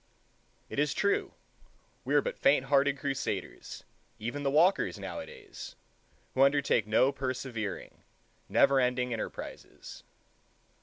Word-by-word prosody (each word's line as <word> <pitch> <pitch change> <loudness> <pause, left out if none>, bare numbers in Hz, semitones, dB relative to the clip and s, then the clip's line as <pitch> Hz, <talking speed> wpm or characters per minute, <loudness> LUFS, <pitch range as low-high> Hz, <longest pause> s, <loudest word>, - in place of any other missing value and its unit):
It - - -4
is 150 0 +1
true, 200 0 0 0.7
we - - 0
are - - +5
but - - -4
faint 140 -2 +4
hearted 140 0 +3
crusaders, 135 -1 -4 0.3
even 120 +6 -4
the 140 - +1
walkers, 160 - +3
nowadays, 95 -4 -8 0.6
who 130 - +1
undertake 140 -6 +3
no 125 +5 +4
persevering, 130 -6 -4 0.5
never 135 -1 +5
ending 125 -1 +1
enterprises. 115 - -7
135 Hz, 110 wpm, -30 LUFS, 120-140 Hz, 0.7 s, are